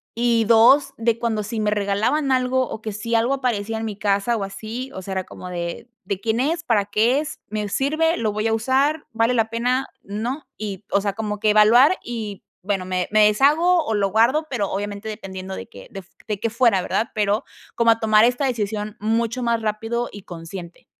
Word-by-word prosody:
y 235 -1 +2
2 255 +5 +5
de 230 0 +1
cuando 230 -3 -1
si 215 +2 -4
me 210 0 +1
regalaban 210 +8 +1
algo 255 0 +1
o 220 - -6
que 220 - -4
si 215 +3 -3
algo 230 +4 +2
aparecía 225 -5 -1
en 225 - -3
mi 210 -3 -5
casa 205 +3 +1
o 210 - -2
así, 220 +6 -6
o 190 - -6
sea, 190 +1 -6
era 190 0 -1
como 180 - -10
de: 175 +6 -5
"¿De 200 -2 -3
quién 225 +2 -1
es? 320 +4 0
¿Para 225 -9 +2
qué 220 +6 +2
es? 300 0 -6
¿Me 210 0 -3
sirve? 310 - +1
¿Lo 220 -2 -1
voy 215 +1 -1
a 225 - +1
usar? 265 +7 +1
¿Vale 230 +2 +2
la 225 -2 +1
pena?, 250 +3 0 0.2
¿no?", 235 +9 -4
y, 210 -2 -5
o 200 - +3
sea, 200 0 -1
como 210 0 -4
que 215 0 +3
evaluar 235 - +6
y 220 -5 -6 0.2
bueno, 195 -1 -1
me 185 -1 -1
me 215 0 +6
deshago 305 +10 +3
o 225 - -1
lo 200 -1 +1
guardo, 260 +9 +3
pero, 210 -7 -1
obviamente 205 +2 -4
dependiendo 190 -3 -7
de 95 - -8
que 100 - -12
f 195 -3 -9 0.2
de 210 -2 -2
que 230 - 0
fuera, 230 -4 +3
¿verdad?, 225 +6 -1
pero, 210 +3 +1 0.3
como 230 -1 +4
a 225 - +1
tomar 215 0 +5
esta 245 +3 +1
decisión 215 -2 -3
mucho 230 +3 -1
más 235 -1 +1
rápido 225 +3 -2
y 205 -1 -10
consciente. 170 0 -9
220 Hz, 210 wpm, -22 LUFS, 205-245 Hz, 0.3 s, evaluar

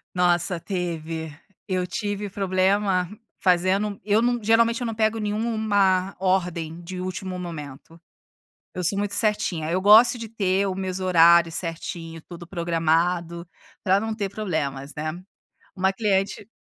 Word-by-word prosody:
Nossa! 175 -1 +1
Teve. 165 -4 -4 0.3
Eu 185 -1 0
tive 205 +2 -3
problema 190 -1 +1 0.4
fazendo 190 +3 +2
eu 215 +2 +3
não 240 -1 +1
geralmente 230 +2 +3
eu 240 - -2
não 225 - -4
pego 220 0 +1
nenhuma 205 -3 +1
ordem 175 -3 -1
de 180 +1 -6
último 185 0 -5
momento, 165 -2 -8 0.8
eu 180 - -3
sou 195 +4 +1
muito 205 0 -2
certinha, 175 -7 0
eu 185 - +1
gosto 220 +5 +7
de 225 - -6
ter 195 -2 0
o 185 - -2
meus 190 -1 -3
horários 170 -2 +5
certinho, 165 -1 -5
tudo 175 0 -11
programado, 170 0 0 0.3
pra 190 -1 +3
não 220 +1 -3
ter 200 -3 -2
problemas, 150 -9 -3
né. 155 +1 -3 0.6
Uma 190 +1 +2
cliente 200 0 -1
185 Hz, 135 wpm, -24 LUFS, 170-205 Hz, 0.8 s, gosto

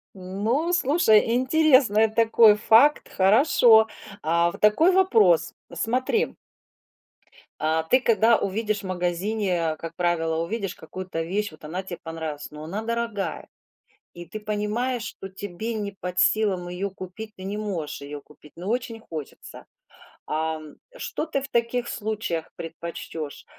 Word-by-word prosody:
Ну, 210 - -1
слушай, 255 -9 +4
интересный 260 -5 +4
такой 225 -1 +5
факт, 230 +7 +4
хорошо. 220 +2 +5 0.3
А, 170 +2 +2
вот - - -12
такой 260 - +5
вопрос. 225 - +3 0.2
Смотри 255 - 0 1.2
А, 160 +1 +1
ты 255 +11 +3
когда 230 -1 +4
увидишь 210 +1 -1
в - - -11
магазине, 180 -1 -1
как 165 +1 -8
правило, 165 -2 0
увидишь 195 +3 -3
какую-то 180 0 -6
вещь, 200 +5 -2
вот 155 - -17
она 180 +5 -4
тебе 175 -2 -7
понравилась. 160 -3 -6
Но 150 0 -9
она 190 +7 -4
дорогая, 230 -3 -3 0.7
и 175 0 -9
ты 195 +6 -7
понимаешь, 215 +4 -2
что 195 -3 -8
тебе 205 +4 -5
не 205 -2 -4
под 180 0 -3
силам 195 -5 +2
её 180 +3 -3
купить. 190 +3 -9
Ты 185 - -11
не 200 +2 -4
можешь 185 -10 -4
её 145 0 -7
купить, 150 0 -19
но 180 +3 -8
очень 235 -1 -2
хочется. 155 -9 -9 0.6
Ам, 155 -1 -3 0.2
что 465 -9 -4
ты 275 -4 -2
в 275 - -6
таких 235 0 0
случаях 210 -7 -3
предпочтёшь? 165 -2 -7
205 Hz, 135 wpm, -25 LUFS, 170-230 Hz, 1.2 s, такой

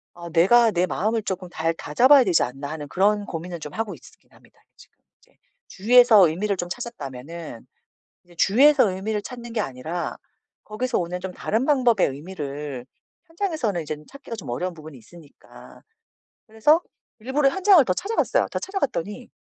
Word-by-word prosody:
'아 170 0 -9
내가 220 +8 +5
내 180 -2 +1
마음을 220 +5 -1
쪼끔 185 -2 -5
잘 165 -1 -1
다잡아야 255 - +4
되지 180 -4 +3
않나.' 135 +3 -6
하는 155 -2 -6
그런 205 +4 +1
고민을 170 0 -6
좀 150 -1 -9
하고 225 -2 -3
있으긴 - - -20
합니다 - - -24 0.2
지금 - - -20 0.2
이제. - - -30 0.3
주위에서 220 -2 +6
의미를 195 +5 -2
좀 175 - -3
찾았다면은 160 - -8 0.6
이제 175 0 -20
주위에서 260 - +5
의미를 205 +3 -3
찾는 240 0 -9
게 225 - -1
아니라 160 +3 -4 0.5
거기서 245 +4 -2
오는 180 0 -3
좀 185 0 -6
다른 220 +6 -1
방법의 250 -9 +3
의미를 145 -4 -7 0.4
현장에서는 320 - -2
이젠 150 0 -7
찾기가 280 -4 -9
좀 200 - -8
어려운 180 +10 -3
부분이 155 -3 -12
있으니까. 150 +6 -17 0.6
그래서 230 +9 +3 0.4
일부러 270 +5 +1
현장을 375 -2 +5
더 185 - 0
찾아갔어요. 405 - 0
더 - - -2
찾아갔더니 250 - -4
190 Hz, 375 characters per minute, -23 LUFS, 165-240 Hz, 0.6 s, 주위에서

